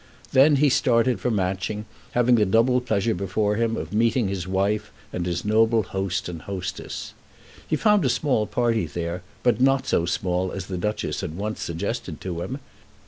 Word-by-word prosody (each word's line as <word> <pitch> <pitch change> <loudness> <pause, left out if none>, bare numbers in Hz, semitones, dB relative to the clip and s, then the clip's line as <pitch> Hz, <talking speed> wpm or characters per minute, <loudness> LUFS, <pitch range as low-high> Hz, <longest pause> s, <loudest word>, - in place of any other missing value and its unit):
Then 140 +3 +6
he 145 +1 +4
started 125 -1 +2
for - - -1
Matching, 100 +1 -1 0.3
having 120 0 +4
the 115 -3 +5
double 115 +5 +3
pleasure 110 -2 0
before 105 +2 0
him 115 -1 0
of - - -5
meeting 115 0 +2
his 95 -2 -3
wife 100 +3 0 0.2
and 90 0 -2
his 85 +1 -2
noble 110 +1 +3
host 95 0 -2
and 85 -3 -6
hostess. 95 0 -5 0.5
He - - +1
found 210 -4 +3
a 130 - +2
small 120 -4 +1
party 115 -7 +1
there, 85 +3 -4 0.2
but 120 -2 +2
not 135 0 +3
so 85 - +1
small 90 +1 -1
as 95 -2 -4
the 95 - -5
Duchess 105 +3 -2
had 85 -4 -5
once 105 +2 -3
suggested 95 0 -4
to 85 -2 -4
him. 130 +9 -4
105 Hz, 180 wpm, -24 LUFS, 95-120 Hz, 0.5 s, Then